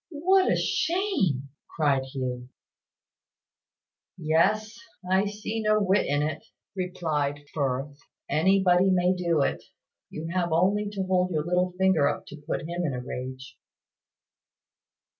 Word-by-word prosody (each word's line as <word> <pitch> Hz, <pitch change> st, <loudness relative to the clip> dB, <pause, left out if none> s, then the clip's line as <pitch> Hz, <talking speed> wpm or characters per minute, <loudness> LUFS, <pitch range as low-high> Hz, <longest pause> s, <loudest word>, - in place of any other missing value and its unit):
"What 370 Hz, +4 st, +3 dB
a -, -, +3 dB
shame!" 310 Hz, -, 0 dB, 0.3 s
cried 145 Hz, -4 st, +2 dB
Hugh. 125 Hz, -2 st, -5 dB, 1.7 s
"Yes: 200 Hz, +8 st, +1 dB, 0.3 s
I 190 Hz, +2 st, +2 dB
see 215 Hz, +2 st, -4 dB
no 215 Hz, 0 st, +3 dB
wit 200 Hz, 0 st, +2 dB
in 145 Hz, +1 st, +1 dB
it," 155 Hz, 0 st, -3 dB, 0.3 s
replied 155 Hz, -6 st, -2 dB
Firth. 140 Hz, 0 st, -2 dB, 0.3 s
"Anybody 190 Hz, +2 st, +3 dB
may 180 Hz, -1 st, +3 dB
do 170 Hz, -5 st, +1 dB
it. -, -, -1 dB, 0.5 s
You 160 Hz, +1 st, -6 dB
have 175 Hz, -2 st, 0 dB
only 200 Hz, +5 st, +2 dB
to 195 Hz, -2 st, -2 dB
hold 185 Hz, -1 st, +1 dB
your 155 Hz, -4 st, -1 dB
little 180 Hz, +1 st, +1 dB
finger 190 Hz, -6 st, +3 dB
up -, -, -4 dB
to -, -, -9 dB
put -, -, -1 dB
him 175 Hz, +2 st, -4 dB
in 140 Hz, -6 st, -1 dB
a -, -, -3 dB
rage." 130 Hz, +1 st, -7 dB
180 Hz, 130 wpm, -26 LUFS, 145-195 Hz, 1.7 s, What